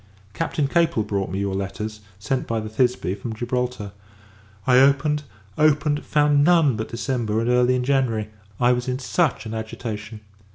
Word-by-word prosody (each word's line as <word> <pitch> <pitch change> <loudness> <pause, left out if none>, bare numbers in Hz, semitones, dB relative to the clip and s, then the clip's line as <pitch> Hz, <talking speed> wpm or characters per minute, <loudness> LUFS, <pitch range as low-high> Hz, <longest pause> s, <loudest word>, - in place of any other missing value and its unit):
Captain 155 -1 -1
Capel 165 -8 +2
brought 100 -2 -2
me 95 +2 -3
your 100 -1 -1
letters, 100 +3 -4 0.2
sent 120 +6 -2
by 115 -1 -1
the 110 0 -5
Thisbe, 125 -4 0
from 110 +2 -6
Gibraltar. 120 -2 -3 0.7
I 125 -1 +5
opened 140 +2 +3 0.4
opened 150 -1 +2
found 145 -1 +3
none 160 -6 +4
but 110 +1 -4
December, 115 -3 -1
and 115 - -1
early 125 +1 +3
in 125 - 0
January. 125 -5 0 0.3
I 120 0 +4
was 125 0 -1
in 125 0 -1
such 140 0 0
an 110 - -5
agitation! 110 -1 -6
125 Hz, 165 wpm, -23 LUFS, 110-140 Hz, 0.7 s, I